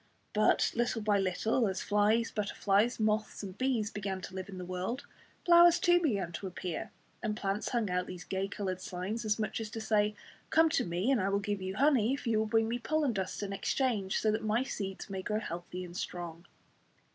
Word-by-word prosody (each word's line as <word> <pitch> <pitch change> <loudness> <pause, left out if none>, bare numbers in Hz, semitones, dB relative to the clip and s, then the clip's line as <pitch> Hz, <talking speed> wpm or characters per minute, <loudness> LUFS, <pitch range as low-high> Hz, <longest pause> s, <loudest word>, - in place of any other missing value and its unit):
But 215 0 +3
little 235 -2 0
by 205 -1 +3
little, 215 +5 +1
as 190 -1 -2
flies, 210 +3 +2
butterflies, 210 +2 +1
moths 215 0 0
and 190 -2 -6
bees 235 -3 0
began 195 -2 -3
to 185 - -8
live 190 +1 -5
in 190 - -8
the 180 - -5
world, 185 +9 -3 0.4
flowers 345 0 +8
too 350 -2 +5
began 200 - 0
to 190 +3 -5
appear, 180 -2 -4 0.3
and 215 -1 -2
plants 200 +1 -1
hung 235 -4 0
out 180 0 0
these 180 -1 -7
gay 190 0 -2
coloured 190 -2 -3
signs, 195 +7 -4
as 210 0 +1
much 215 0 -2
as 220 - -5
to 225 - -6
say, 215 -1 +1 0.3
"Come 320 0 +5
to - - +1
me, 180 +8 0
and 255 -7 +3
I 190 - +1
will 200 - +2
give 205 -1 -2
you 190 +1 -4
honey 265 -2 +3
if 280 - -9
you 225 -2 +2
will 220 - 0
bring 225 +1 +2
me 240 +2 -2
pollen 300 0 +1
dust 190 0 -3
in 200 -1 -3
exchange, 200 -1 0
so 215 - +2
that 215 - -1
my 215 +3 +2
seeds 195 -7 -5
may 190 -2 -4
grow 210 +3 -1
healthy 175 -2 -6
and 175 0 -11
strong." 175 -2 -5
210 Hz, 215 wpm, -32 LUFS, 190-230 Hz, 0.4 s, flowers